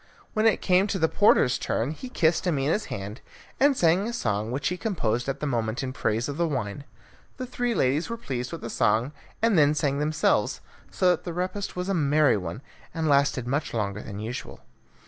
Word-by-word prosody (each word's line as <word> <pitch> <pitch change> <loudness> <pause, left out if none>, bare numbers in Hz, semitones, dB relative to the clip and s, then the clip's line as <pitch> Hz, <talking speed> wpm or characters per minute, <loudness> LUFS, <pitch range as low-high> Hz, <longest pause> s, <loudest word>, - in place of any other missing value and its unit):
When 220 0 +3
it 220 - +2
came 185 +2 +4
to 200 - -1
the 160 -3 +3
porter's 160 - +4
turn 120 +6 -1
he 250 +11 -8
kissed 170 -6 +1
Amina's 155 +5 +1
hand, 100 +5 -6 0.4
and 280 -1 +4
sang 175 +5 +3
a 235 - -4
song, 105 - -1
which 135 +4 -1
he 180 - -2
composed 135 - -1
at 135 - -3
the - - -1
moment 115 -2 -1
in 130 -1 -4
praise 115 -1 -1
of 145 0 -5
the 170 0 +1
wine. 130 -2 -3 0.5
The 255 - -4
three 245 -1 -2
ladies 145 - +1
were 230 - -3
pleased 125 - -4
with 165 - -6
the 115 - -5
song, 115 +5 +2 0.3
and 225 -7 +4
then 150 0 +4
sang 145 -2 0
themselves, 155 +1 +1 0.3
so 185 -1 +3
that - - -1
the 175 - -5
repast 185 +3 -3
was 180 +1 -3
a 195 - 0
merry 150 -3 +3
one, 95 +5 -5 0.3
and 160 -1 -1
lasted 140 -4 +2
much 140 +2 -2
longer 105 -2 -2
than 100 - -8
usual. 110 +4 -6
145 Hz, 205 wpm, -26 LUFS, 120-180 Hz, 0.5 s, came